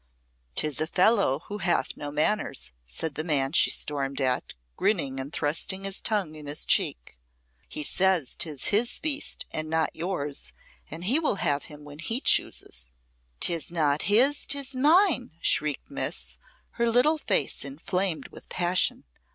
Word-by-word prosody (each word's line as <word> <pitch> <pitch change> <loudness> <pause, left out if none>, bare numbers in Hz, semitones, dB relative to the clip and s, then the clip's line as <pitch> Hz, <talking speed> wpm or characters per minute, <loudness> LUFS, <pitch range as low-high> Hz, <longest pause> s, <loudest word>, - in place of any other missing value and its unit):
"'Tis 150 -1 0
a 155 - 0
fellow 185 - +3
who 205 0 -6
hath 175 -2 0
no 145 - -6
manners," 150 0 -1
said 100 - -4
the 155 - -3
man 140 -5 0
she - - +5
stormed 140 -2 -1
at, 130 -2 -1 0.2
grinning 140 - 0
and 135 +2 -5
thrusting 165 +6 -1
his 195 0 -1
tongue 200 -8 0
in 150 -2 -10
his 145 +1 0
cheek. - - 0 0.5
"He 150 - -3
says 185 -3 +1
'tis 150 -5 +1
his 225 +4 +1
beast, 300 -2 -1
and 155 0 -2
not 160 0 0
yours, 145 - -4 0.4
and 165 +3 -7
he 250 - +3
will 310 -9 +1
have 145 -6 0
him 150 -1 -12
when 145 0 -12
he 225 +9 -1
chooses." - - +1 0.5
"'Tis 170 -1 +2
not 150 -3 +1
his 260 +8 +4
'tis 280 -1 0
mine!" 295 - +3
shrieked 150 -3 +1
Miss, 65 0 -4 0.4
her 235 0 +3
little 255 +7 +3
face - - -1
inflamed 165 +5 -2
with - - -14
passion. 180 +1 +1
160 Hz, 155 wpm, -27 LUFS, 145-210 Hz, 0.5 s, she